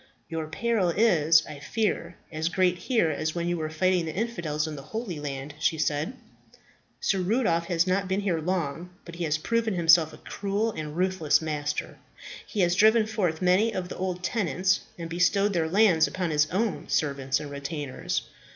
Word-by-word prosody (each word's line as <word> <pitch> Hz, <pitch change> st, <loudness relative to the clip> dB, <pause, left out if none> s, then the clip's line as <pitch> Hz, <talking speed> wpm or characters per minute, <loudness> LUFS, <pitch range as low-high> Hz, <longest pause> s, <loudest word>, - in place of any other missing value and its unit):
"Your 160 Hz, -1 st, -3 dB
peril 205 Hz, +2 st, 0 dB
is, 165 Hz, -6 st, +4 dB
I 150 Hz, -2 st, -9 dB
fear, 180 Hz, -1 st, -2 dB
as 160 Hz, +1 st, -1 dB
great 180 Hz, 0 st, +2 dB
here 200 Hz, -5 st, +1 dB
as 155 Hz, +2 st, -2 dB
when 170 Hz, 0 st, -1 dB
you 175 Hz, 0 st, 0 dB
were 155 Hz, -1 st, -3 dB
fighting 180 Hz, +2 st, +1 dB
the 155 Hz, -, -5 dB
infidels 175 Hz, -9 st, -2 dB
in 155 Hz, -, -5 dB
the 140 Hz, -, -7 dB
Holy 185 Hz, -, -5 dB
Land," 140 Hz, 0 st, -5 dB
she 160 Hz, +1 st, +1 dB
said. 150 Hz, -, -1 dB, 0.9 s
"Sir 195 Hz, -, +1 dB
Rudolph 180 Hz, -4 st, +1 dB
has 170 Hz, -2 st, +2 dB
not 190 Hz, +1 st, 0 dB
been 190 Hz, +2 st, 0 dB
here 185 Hz, -5 st, 0 dB
long; 170 Hz, -1 st, -2 dB, 0.2 s
but 170 Hz, -, -10 dB
he 175 Hz, -, -2 dB
has 155 Hz, 0 st, +1 dB
proved 230 Hz, +8 st, -1 dB
himself 165 Hz, -5 st, +4 dB
a -, -, -12 dB
cruel 205 Hz, +3 st, -2 dB
and 155 Hz, -4 st, -6 dB
ruthless 185 Hz, -4 st, +2 dB
master. 150 Hz, -2 st, -3 dB, 0.5 s
He 210 Hz, -, -1 dB
has 175 Hz, -1 st, +3 dB
driven 220 Hz, +3 st, +5 dB
forth 190 Hz, -6 st, -1 dB
many 190 Hz, +5 st, +4 dB
of 180 Hz, -1 st, -3 dB
the -, -, -7 dB
old 180 Hz, -1 st, -3 dB
tenants 185 Hz, -, +1 dB, 0.2 s
and 170 Hz, -1 st, -5 dB
bestowed 190 Hz, +4 st, +2 dB
their 165 Hz, -3 st, 0 dB
lands 185 Hz, -4 st, +4 dB
upon 180 Hz, -3 st, -2 dB
his 150 Hz, 0 st, +2 dB
own 205 Hz, +2 st, -1 dB
servants 140 Hz, -2 st, 0 dB
and 150 Hz, -1 st, -7 dB
retainers. 140 Hz, -1 st, -3 dB
175 Hz, 185 wpm, -27 LUFS, 155-195 Hz, 0.9 s, driven